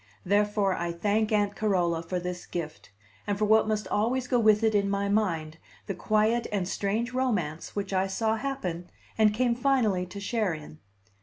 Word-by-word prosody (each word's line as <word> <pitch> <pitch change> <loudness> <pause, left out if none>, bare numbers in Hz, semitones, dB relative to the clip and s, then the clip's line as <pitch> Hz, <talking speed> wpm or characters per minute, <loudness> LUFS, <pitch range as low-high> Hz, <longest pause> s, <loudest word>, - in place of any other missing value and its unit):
Therefore 205 0 +2
I 170 -1 -2
thank 210 +5 0
Aunt 205 -1 +1
Carola 175 -6 +1
for 180 +2 -3
this 180 0 -6
gift, 160 -7 -6 0.4
and 205 -1 0
for 215 - +1
what 220 +1 +4
must 215 -2 -1
always 245 +4 0
go 250 -1 +2
with 215 -1 +4
it 220 -1 +3
in 200 -1 +2
my 200 0 0
mind, 165 -7 0 0.3
the 195 - -3
quiet 215 +5 +1
and 195 -4 -1
strange 215 +6 -1
romance 205 -12 -2
which 200 -1 -3
I 190 0 +2
saw 220 +3 0
happen, 185 -10 -4 0.3
and 215 -1 +4
came 240 +2 +1
finally 235 -8 +1
to 200 +3 -8
share 200 -3 -1
in. 155 0 -11
205 Hz, 180 wpm, -28 LUFS, 180-220 Hz, 0.4 s, what